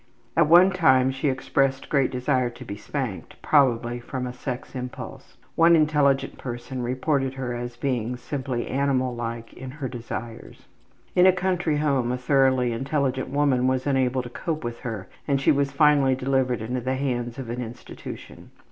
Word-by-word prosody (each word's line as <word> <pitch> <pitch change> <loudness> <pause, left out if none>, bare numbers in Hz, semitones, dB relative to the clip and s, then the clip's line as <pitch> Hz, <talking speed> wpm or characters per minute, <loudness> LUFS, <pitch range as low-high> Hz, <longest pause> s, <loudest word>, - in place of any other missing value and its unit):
At 165 -2 +4
one 175 +4 +7
time 130 -8 +4
she 135 +2 -1
expressed 135 0 0
great 140 -3 +2
desire 125 0 0
to 120 - -11
be 100 - -6
spanked, 110 -1 -5
probably 120 -4 +3
from 125 +1 -5
a 125 - -5
sex 125 0 -6
impulse. 125 -2 -8 0.2
One 170 +1 +6
intelligent 150 -3 +2
person 125 +1 -5
reported 135 +2 0
her 125 -2 -3
as 120 0 -5
being 125 -1 -2
simply 130 -2 -3
animal 130 -2 0
like 115 -1 -5
in 130 0 -8
her 140 0 -5
desires. 115 -2 -7 0.5
In 180 +1 +6
a - - +8
country 180 -4 0
home 135 -5 +1
a 125 - -1
thoroughly 130 -1 +2
intelligent 135 +2 -1
woman 135 -3 +2
was 130 0 0
unable 130 -2 +1
to 120 - -8
cope 155 +5 -4
with 120 0 -5
her 110 -7 -5 0.2
and 140 -2 +2
she 135 - +4
was 140 -1 +1
finally 140 -2 +4
delivered 130 -3 0
into 125 +3 -2
the 130 +2 -1
hands 120 -3 -2
of 125 -4 -5
an 125 +1 -3
institution. 120 0 -9
130 Hz, 170 wpm, -25 LUFS, 120-140 Hz, 0.5 s, a